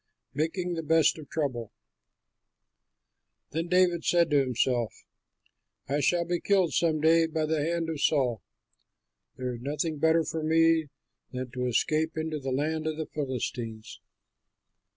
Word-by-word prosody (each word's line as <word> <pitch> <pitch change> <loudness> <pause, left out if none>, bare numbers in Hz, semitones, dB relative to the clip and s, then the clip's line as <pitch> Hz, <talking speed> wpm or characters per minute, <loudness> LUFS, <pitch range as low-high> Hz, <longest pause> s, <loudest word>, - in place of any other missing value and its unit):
MAKING 175 +4 -1
THE 165 - -3
BEST 160 0 +3
OF 150 - -11
TROUBLE 130 -8 -3 1.8
Then 165 +2 -2
David 180 -1 +3
said 170 -2 +3
to 145 - +5
himself, 125 -3 0 1.0
"I 145 +2 0
shall 170 +4 +2
be 175 0 -1
killed 190 -4 +2
some 160 -3 +1
day 165 +1 +4
by 160 -1 -1
the 155 -1 0
hand 165 +1 -1
of 160 -3 -4
Saul. 125 -8 +2 0.9
There 125 -1 -3
is 120 - -8
nothing 150 +3 -2
better 160 +1 +3
for 160 0 -4
me 160 0 +3 0.4
than 125 -1 -5
to 125 0 -2
escape 155 +6 0
into 155 -1 -2
the 135 -1 -4
land 155 +4 -1
of 155 -1 -2
the 160 - -3
Philistines. 125 -6 -5
155 Hz, 145 wpm, -28 LUFS, 135-165 Hz, 1.8 s, to